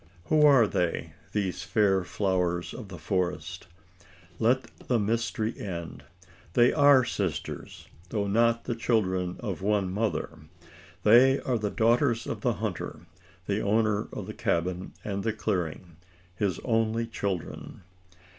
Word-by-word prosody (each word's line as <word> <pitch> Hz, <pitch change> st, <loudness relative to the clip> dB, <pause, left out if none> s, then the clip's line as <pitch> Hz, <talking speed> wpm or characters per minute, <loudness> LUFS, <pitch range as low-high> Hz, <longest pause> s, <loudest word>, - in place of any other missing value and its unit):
Who 155 Hz, -1 st, +4 dB
are 135 Hz, -5 st, +6 dB
they 90 Hz, -4 st, -1 dB, 0.2 s
these 100 Hz, -4 st, -2 dB
fair 100 Hz, -4 st, +2 dB
flowers 90 Hz, -2 st, -1 dB
of 110 Hz, -, -8 dB
the 95 Hz, -2 st, -9 dB
forest? 90 Hz, -1 st, -2 dB, 0.7 s
Let 125 Hz, +3 st, +3 dB, 0.2 s
the 125 Hz, -, +3 dB
mystery 115 Hz, +1 st, -1 dB
end. 85 Hz, -7 st, -6 dB, 0.5 s
They 120 Hz, +4 st, +5 dB
are 145 Hz, -4 st, +6 dB
sisters 95 Hz, -9 st, -4 dB, 0.2 s
though 105 Hz, -1 st, -1 dB
not 115 Hz, +3 st, +2 dB
the 120 Hz, -, -2 dB
children 95 Hz, -6 st, 0 dB
of 100 Hz, -6 st, -4 dB
one 100 Hz, -2 st, +1 dB
mother. 100 Hz, -4 st, -2 dB, 0.6 s
They 130 Hz, +5 st, +6 dB
are 125 Hz, -3 st, -1 dB
the 105 Hz, -1 st, -1 dB
daughters 115 Hz, +1 st, +2 dB
of -, -, -4 dB
the -, -, +1 dB
hunter -, -, -4 dB, 0.4 s
the 100 Hz, +2 st, -1 dB
owner 105 Hz, 0 st, +1 dB
of -, -, -6 dB
the -, -, -7 dB
cabin 90 Hz, +2 st, -1 dB
and 100 Hz, -1 st, -3 dB
clearing 90 Hz, -5 st, -3 dB, 0.4 s
his 100 Hz, -3 st, -1 dB
only 115 Hz, -1 st, +1 dB
children. 100 Hz, -4 st, -5 dB
105 Hz, 130 wpm, -28 LUFS, 90-115 Hz, 0.7 s, are